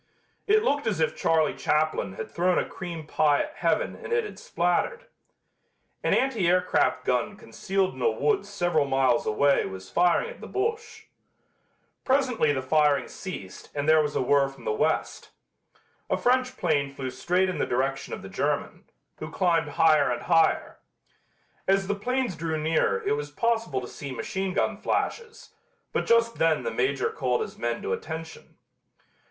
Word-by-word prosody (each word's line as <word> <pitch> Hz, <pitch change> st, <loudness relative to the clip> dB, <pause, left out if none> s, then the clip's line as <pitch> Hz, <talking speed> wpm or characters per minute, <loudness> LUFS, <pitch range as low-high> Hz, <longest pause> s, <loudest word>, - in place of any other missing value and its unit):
It 430 Hz, +1 st, +4 dB
looked 290 Hz, -, 0 dB
as 205 Hz, -6 st, 0 dB
if 160 Hz, -, +1 dB
Charlie 160 Hz, -2 st, +2 dB
Chaplin 150 Hz, -11 st, 0 dB
had -, -, -7 dB
thrown 180 Hz, +1 st, +1 dB
a -, -, 0 dB
cream 170 Hz, -4 st, -7 dB
pie 150 Hz, -1 st, +2 dB
at 310 Hz, +3 st, -10 dB
heaven -, -, 0 dB
and -, -, -9 dB
it 470 Hz, 0 st, +2 dB
had 425 Hz, -, -8 dB
splattered. -, -, -1 dB, 1.0 s
An -, -, +3 dB
anti 245 Hz, -9 st, +1 dB
aircraft 180 Hz, +1 st, +2 dB
gun 125 Hz, -, 0 dB
concealed 195 Hz, -2 st, -2 dB
in -, -, -10 dB
a 465 Hz, -, +4 dB
woods 425 Hz, -, 0 dB
several 175 Hz, -7 st, +1 dB
miles 135 Hz, -3 st, +2 dB
away 140 Hz, +6 st, +3 dB
was 95 Hz, 0 st, -9 dB
firing 180 Hz, -, +2 dB
at -, -, -13 dB
the -, -, -8 dB
Boche. 445 Hz, +3 st, -3 dB, 1.0 s
Presently 260 Hz, -, +2 dB
the 130 Hz, -2 st, -2 dB
firing 150 Hz, 0 st, +2 dB
ceased 100 Hz, -, -8 dB
and 145 Hz, 0 st, -2 dB
there 155 Hz, 0 st, +6 dB
was 150 Hz, -1 st, -2 dB
a -, -, +1 dB
whirr 140 Hz, +1 st, +3 dB
from 135 Hz, -, -15 dB
the -, -, 0 dB
West. 155 Hz, +8 st, -1 dB, 0.8 s
A -, -, +1 dB
French 255 Hz, +1 st, +1 dB
plane 145 Hz, -5 st, +1 dB
flew 135 Hz, -2 st, -5 dB
straight 180 Hz, +8 st, +1 dB
in 185 Hz, -, -3 dB
the -, -, 0 dB
direction 135 Hz, +2 st, -1 dB
of -, -, -6 dB
the -, -, -7 dB
German, -, -, -2 dB, 0.3 s
who 155 Hz, -, -6 dB
climbed 165 Hz, -3 st, +1 dB
higher 155 Hz, 0 st, +4 dB
and -, -, -2 dB
higher. 165 Hz, -2 st, +2 dB, 0.9 s
As 195 Hz, 0 st, +3 dB
the 205 Hz, -, 0 dB
planes 245 Hz, +1 st, -1 dB
drew 160 Hz, -1 st, -2 dB
nearer 155 Hz, -11 st, +1 dB
it -, -, 0 dB
was 145 Hz, 0 st, -3 dB
possible 225 Hz, -, -1 dB
to 125 Hz, -, -7 dB
see 140 Hz, +1 st, -8 dB
machine 190 Hz, +7 st, -3 dB
gun -, -, 0 dB
flashes, 460 Hz, -1 st, -3 dB, 0.4 s
but -, -, -1 dB
just 230 Hz, 0 st, +3 dB
then 160 Hz, -5 st, +2 dB
the 115 Hz, -, -2 dB
Major 130 Hz, +4 st, 0 dB
called 125 Hz, -2 st, -1 dB
his -, -, -5 dB
men 120 Hz, 0 st, -2 dB
to 95 Hz, -, -1 dB
attention. 160 Hz, -, -7 dB
165 Hz, 170 wpm, -26 LUFS, 140-220 Hz, 1.0 s, there